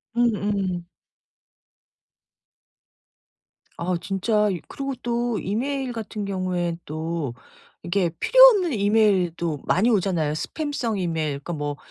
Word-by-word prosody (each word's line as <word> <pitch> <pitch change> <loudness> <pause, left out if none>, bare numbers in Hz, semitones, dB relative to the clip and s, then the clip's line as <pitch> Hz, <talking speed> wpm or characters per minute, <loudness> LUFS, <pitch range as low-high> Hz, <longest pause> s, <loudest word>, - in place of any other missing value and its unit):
음음. 205 -6 0 2.9
아 180 +1 -1
진짜 210 +3 +1
이 185 -3 -2
그리고 275 0 -4
또 240 -1 -1
이메일같은 230 -2 -3
경우엔 180 -3 -2
또 155 -3 -3 0.5
이게 175 0 +1
필요없는 470 - +6
이메일도 195 - +2
많이 215 +7 +3
오잖아요. 180 -8 +1
스팸성 240 - -3
이메일 160 -5 -1
그러니까 170 +4 -6
뭐 145 -1 -3
195 Hz, 230 characters per minute, -24 LUFS, 170-235 Hz, 2.9 s, 필요없는